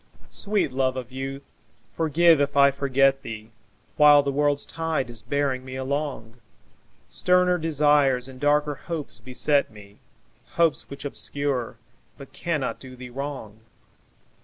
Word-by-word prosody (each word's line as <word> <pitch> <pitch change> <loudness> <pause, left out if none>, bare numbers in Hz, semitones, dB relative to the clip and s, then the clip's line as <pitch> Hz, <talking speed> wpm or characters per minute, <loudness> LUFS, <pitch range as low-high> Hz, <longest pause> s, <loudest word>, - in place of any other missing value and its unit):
Sweet 205 -8 -1
love 130 0 0
of 125 -1 -6
youth, 135 +1 -6 0.5
forgive 165 0 +4
if 145 0 -1
I 140 0 +6
forget 135 0 +2
thee 110 -3 -8 0.5
While 145 -1 +7
the 140 - -1
world's 145 0 0
tide 160 -7 -3
is 115 -1 -8
bearing 140 -2 -1
me 130 0 -8
along; 130 -4 -4 0.7
Sterner 180 0 +2
desires 145 -5 +2
and 130 -1 -12
darker 145 +1 +2
hopes 155 -2 -6
beset 130 +4 +1
me, 105 -1 -16 0.5
Hopes 165 -4 +1
which 140 +1 -9
obscure 140 -4 -3 0.4
but 140 -1 -13
cannot 155 -3 -3
do 130 -1 -11
thee 125 -1 -10
wrong. 135 -5 -6
140 Hz, 135 wpm, -24 LUFS, 130-150 Hz, 0.7 s, While